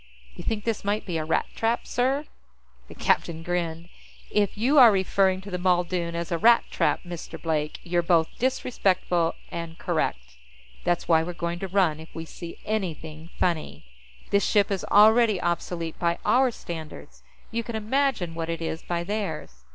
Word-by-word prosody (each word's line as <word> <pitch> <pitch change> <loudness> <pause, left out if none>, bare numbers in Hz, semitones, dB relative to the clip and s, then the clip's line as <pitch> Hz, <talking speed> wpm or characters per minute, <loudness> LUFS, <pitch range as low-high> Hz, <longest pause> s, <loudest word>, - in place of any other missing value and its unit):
"You - - -8
think 215 -2 -2
this 225 -2 -2
might 205 +2 -1
be 170 -4 -2
a - - -2
Rat 160 - +1
trap, 230 +1 0
sir?" 265 +4 0 0.6
The - - -12
captain 165 -1 0
grinned. 170 -1 -3 0.4
"If 205 -1 +1
you 265 +7 +4
are 240 -3 +10
referring 190 -1 +2
to 200 +1 -10
the 180 - -2
Muldoon 175 -1 +1
as 170 0 -4
a 170 - 0
rat 235 +4 +6
trap, - - +1
Mr. 175 -2 -7
Blake, 155 -2 -2
you're 175 0 +1
both 165 -2 +3
disrespectful 190 -9 +1 0.2
and 170 -1 -6
correct. 60 +1 -2 0.5
That's 175 0 0
why 160 -2 +5
we're 175 +2 -4
going 170 0 -3
to 195 - -3
run 180 -5 +2
if 160 - -13
we 165 - -5
see 170 +1 -9
anything 165 -6 -4
funny. 155 - -1 0.5
This 200 0 +3
ship 205 -1 +2
is 195 - -1
already 215 -1 +5
obsolete 170 -1 -2
by 170 -1 +1
our 260 +1 +4
standards; 165 -8 -8 0.3
you 230 0 -1
can 230 0 -6
imagine 220 -5 0
what 165 0 -4
it 165 -1 -2
is 165 -1 -3
by 170 -1 -2
theirs." 160 - -4
175 Hz, 175 wpm, -26 LUFS, 165-210 Hz, 0.6 s, are